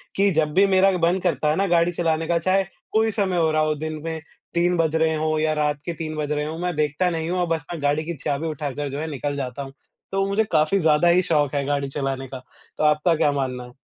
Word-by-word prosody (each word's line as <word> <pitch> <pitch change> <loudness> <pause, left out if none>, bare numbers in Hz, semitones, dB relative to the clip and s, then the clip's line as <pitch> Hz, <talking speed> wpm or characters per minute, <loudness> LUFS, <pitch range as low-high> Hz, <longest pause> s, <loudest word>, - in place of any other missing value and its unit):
कि 200 +1 +3
जब 150 -1 0
भी 195 +2 +5
मेरा 195 +1 +5
मन 175 +2 +2
करता 165 -4 +1
है 150 - +2
ना 195 +3 +1
गाड़ी 170 +1 +3
चलाने 165 -2 -1
का, 170 0 +2
चाहे 185 +3 +2 0.3
कोई 220 0 +2
समय 195 -4 0
हो 160 -2 +2
रहा 155 - +2
हो 155 0 +1
दिन 155 0 -5
में 160 -1 -3 0.3
3 175 +1 +2
बज 160 -1 +1
रहे 160 0 +2
हों 155 0 0
या 155 0 +1
रात 150 -1 -1
के 170 - -2
3 155 -1 -5
बज 150 -1 -3
रहे 150 0 -1
हो 160 +1 -5
मैं 175 0 -2
देखता 150 +4 +1
नहीं 165 -1 -3
हूँ 180 +1 -1
और 175 - +1
बस 160 -2 -2
मैं 160 - -6
गाड़ी 145 +2 +1
की 170 - -3
चाबी 145 +3 -1
उठाकर 145 -2 -4
जो 140 - -4
है 160 - -3
निकल 145 +1 -3
जाता 135 0 -4
हूँ। 135 0 -10 0.4
तो 195 0 +1
मुझे 200 +3 +2
काफ़ी 155 +6 +3
ज़्यादा 160 0 +3
ही 175 +1 +5
शौक 150 -6 +1
है 140 - +1
गाड़ी 140 -1 -1
चलाने 135 -1 -3
का, 130 0 -7 0.4
तो - - -1
आपका 150 +3 +3
क्या 150 -2 +2
मानना 130 -3 -2
है? 125 +1 -14
155 Hz, 265 wpm, -23 LUFS, 145-170 Hz, 0.4 s, भी